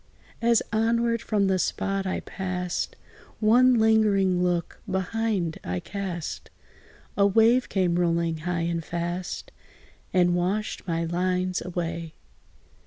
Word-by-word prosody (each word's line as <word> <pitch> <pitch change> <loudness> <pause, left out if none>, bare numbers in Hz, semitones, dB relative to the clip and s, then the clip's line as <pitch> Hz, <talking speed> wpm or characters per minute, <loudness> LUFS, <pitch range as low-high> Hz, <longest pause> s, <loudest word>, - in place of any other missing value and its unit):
As 235 -1 +4
onward 230 +1 +1
from 210 -3 +1
the 190 -1 +2
spot 195 +1 -1
I 185 - -2
passed, 180 -2 -3 0.4
One 245 +4 +5
lingering 210 -5 +3
look 175 -2 -1
behind 190 -2 -1
I 90 +1 -2
cast: 185 - -5 0.7
A 200 0 +4
wave 230 +5 +4
came 185 -3 +1
rolling 170 -1 +1
high 170 +2 -2
and 170 0 -1
fast, 175 +2 -4 0.6
And 175 -1 +3
washed 190 +5 -1
my 165 -1 0
lines 180 +2 0
away. 170 -2 -4
185 Hz, 115 wpm, -26 LUFS, 175-215 Hz, 0.7 s, One